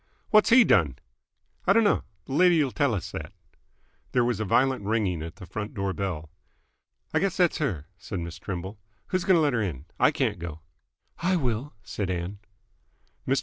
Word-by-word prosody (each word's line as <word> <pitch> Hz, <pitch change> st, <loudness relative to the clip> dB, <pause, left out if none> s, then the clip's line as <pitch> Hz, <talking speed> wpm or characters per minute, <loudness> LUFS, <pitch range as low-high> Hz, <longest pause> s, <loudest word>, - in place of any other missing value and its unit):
"What's 215 Hz, -1 st, +6 dB
he 240 Hz, +1 st, +8 dB
done?" 75 Hz, -, +3 dB, 0.7 s
"I -, -, +7 dB
d'no. 225 Hz, -3 st, +3 dB, 0.2 s
Th' -, -, -21 dB
lady'll 155 Hz, -1 st, +4 dB
tell 140 Hz, -5 st, +1 dB
us 95 Hz, -, -5 dB
that." -, -, -6 dB, 0.8 s
There 125 Hz, -1 st, +3 dB
was 120 Hz, -4 st, 0 dB
a 110 Hz, -, -1 dB
violent 130 Hz, +3 st, +2 dB
ringing 100 Hz, -6 st, 0 dB
at 80 Hz, 0 st, -7 dB
the -, -, -10 dB
front 105 Hz, +2 st, -6 dB
door 100 Hz, -1 st, -1 dB
bell. 85 Hz, -6 st, -4 dB, 0.8 s
"I -, -, +3 dB
guess 195 Hz, -2 st, 0 dB
that's 180 Hz, -3 st, +3 dB
her," 95 Hz, -, -1 dB
said 100 Hz, 0 st, -5 dB
Miss 85 Hz, +1 st, -6 dB
Trimble. 95 Hz, +3 st, -5 dB, 0.3 s
"Who's 185 Hz, -2 st, 0 dB
going 190 Hz, -3 st, +5 dB
to -, -, +3 dB
let 145 Hz, -3 st, +2 dB
'r 115 Hz, -, +1 dB
in? 80 Hz, -9 st, -3 dB
I -, -, +6 dB
can't -, -, -1 dB
go." 80 Hz, -2 st, -6 dB, 0.6 s
"I 185 Hz, +2 st, +2 dB
will," 130 Hz, -3 st, -2 dB
said 100 Hz, -3 st, -3 dB
Ann. 90 Hz, +3 st, -3 dB, 0.9 s
Mr. -, -, +3 dB
105 Hz, 185 wpm, -27 LUFS, 90-150 Hz, 0.9 s, he